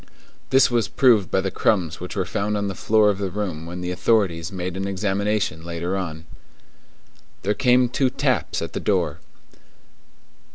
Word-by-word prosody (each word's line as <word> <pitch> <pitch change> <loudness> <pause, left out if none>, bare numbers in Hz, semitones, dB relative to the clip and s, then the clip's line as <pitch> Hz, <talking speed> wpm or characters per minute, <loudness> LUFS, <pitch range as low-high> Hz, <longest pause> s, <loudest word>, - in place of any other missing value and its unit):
This 130 -1 +5
was 115 -5 +1
proved 115 -5 +3
by 95 - +1
the 95 0 -2
crumbs 85 -7 0
which 90 +3 -7
were 95 -3 0
found 105 +3 -1
on 100 -1 -1
the 100 - -3
floor 105 +3 +3
of 100 - -5
the 100 -2 -2
room 90 -5 -4
when 90 +1 -6
the 90 0 -3
authorities 90 -4 +1
made 90 -1 -4
an 95 +1 -3
examination 100 -3 -1
later 85 +2 -3
on. 80 -4 -5 1.2
There 105 - +1
came 125 +1 +3
two 130 +2 +1
taps 130 -2 -1
at - - -6
the - - -2
door. - - 0
100 Hz, 170 wpm, -23 LUFS, 90-110 Hz, 1.2 s, This